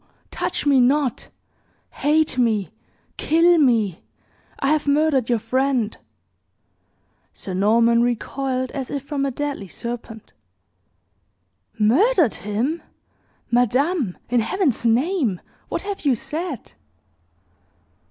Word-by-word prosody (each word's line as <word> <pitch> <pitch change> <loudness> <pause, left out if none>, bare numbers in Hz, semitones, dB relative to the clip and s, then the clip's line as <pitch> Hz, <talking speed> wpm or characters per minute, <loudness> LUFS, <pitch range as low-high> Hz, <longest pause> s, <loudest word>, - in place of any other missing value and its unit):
Touch - - -2
me 280 -2 +4
not! 270 0 +1 0.6
Hate 305 -1 +1
me 220 -5 +1 0.5
kill 335 +2 +4
me! 225 - +2 0.6
I 275 - 0
have 305 -1 +1
murdered 285 -4 +2
your 240 - +3
friend!" 250 0 0 1.4
Sir 190 - -7
Norman 230 +5 +3
recoiled 255 +2 -2
as 270 -3 -5
if 280 -2 -4
from 280 -1 -2
a - - 0
deadly 280 -5 -4
serpent. 235 +1 -8 1.4
"Murdered 295 - +3
him! 225 - -2 0.7
Madame, 250 - +1
in 245 0 +2
Heaven's 265 - 0
name, 250 - +1 0.3
what - - -3
have 400 -1 -5
you 275 -4 +3
said?" 310 - -5
260 Hz, 105 wpm, -22 LUFS, 230-295 Hz, 1.4 s, me